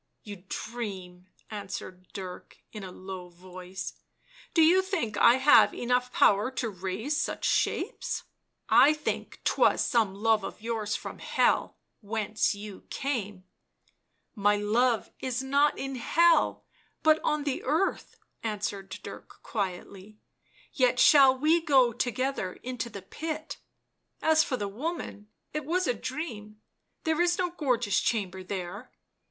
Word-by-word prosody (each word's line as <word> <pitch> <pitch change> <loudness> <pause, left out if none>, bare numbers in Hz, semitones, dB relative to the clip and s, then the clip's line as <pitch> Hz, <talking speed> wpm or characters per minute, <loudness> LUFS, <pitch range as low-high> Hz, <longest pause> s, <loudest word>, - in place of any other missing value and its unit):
" - - -50
You 205 -4 -9
dream," 190 -6 -6 0.2
answered 190 -3 -7
Dirk 185 -2 -8
in 215 -3 -8
a 185 - -7
low 185 -1 -8
voice. 185 +1 -8 0.3
" - - -25
Do 325 - +6
you 355 +4 +6
think 360 - -2
I 235 - +7
have 265 +3 +6
enough 250 +1 0
power 210 +1 +4
to 235 -3 -3
raise 205 - -2
such - - -3
shapes - - 0 0.2
?" - - -52
" - - -44 0.2
I 305 - +5
think 305 0 -4
'twas - - +3
some 220 -5 +1
love 220 0 +2
of - - -6
yours 220 -1 -2
from - - -7
Hell - - +1 0.2
— - - -50
whence 215 -1 0
you 205 -1 -10
came 210 -9 -3 0.3
" - - -41
" - - -48
My 205 0 +6
love 220 +3 +1
is 260 0 -2
not 280 +2 +2
in 270 0 -4
Hell, 330 +5 +3 0.4
but 315 0 +5
on 300 -1 0
the 285 -3 -2
earth," 320 +8 -1 0.3
answered 205 -3 -3
Dirk - - -11
quietly 200 0 -5 0.2
— - - -40
" - - -26
yet 250 -2 +2
shall 265 0 +7
we 315 +5 +3
go 265 -7 +4
together 250 -4 -2
into 245 -2 -4
the 200 -4 -9
pit 315 +8 -5 0.3
— - - -42
as 315 0 +5
for 255 - -2
the 205 - -3
woman, 230 - -5 0.3
it 305 0 -2
was 360 +6 0
a 250 - +1
dream 220 -5 -6 0.2
— - - -50
there 320 +1 +1
is 350 0 +2
no 360 -2 0
gorgeous 245 - +1
chamber 190 -5 -1
there." 190 +4 -6
235 Hz, 160 wpm, -28 LUFS, 200-290 Hz, 0.4 s, I